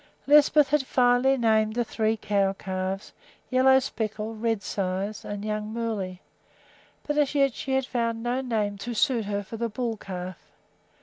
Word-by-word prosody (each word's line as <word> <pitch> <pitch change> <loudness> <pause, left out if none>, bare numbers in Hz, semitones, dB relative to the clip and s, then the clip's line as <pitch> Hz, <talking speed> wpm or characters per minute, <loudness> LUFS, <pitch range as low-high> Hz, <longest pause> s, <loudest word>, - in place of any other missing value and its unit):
Lisbeth 295 0 +6
had 295 -1 +2
finally 250 +1 +3
named 220 -2 +2
the 240 - +1
three 220 -1 0
cow 200 -2 +1
calves 190 0 -4 0.4
Yellow 260 +1 +6
Speckle, 220 -4 -3
Redsides, 205 -3 -2
and 205 0 -5
Young 215 0 -3
Moolley, 215 -6 -3 0.8
but 295 0 0
as 295 0 +1
yet 275 -3 +3
she 265 - -4
had 265 -1 +1
found 230 -3 -2
no 245 +2 0
name 210 -5 -1
to 235 +4 -5
suit 230 -1 +2
her 205 0 -2
for 225 +3 -8
the 235 +1 -1
bull 225 0 -3
calf. 185 -2 -6
225 Hz, 160 wpm, -26 LUFS, 205-255 Hz, 0.8 s, Lisbeth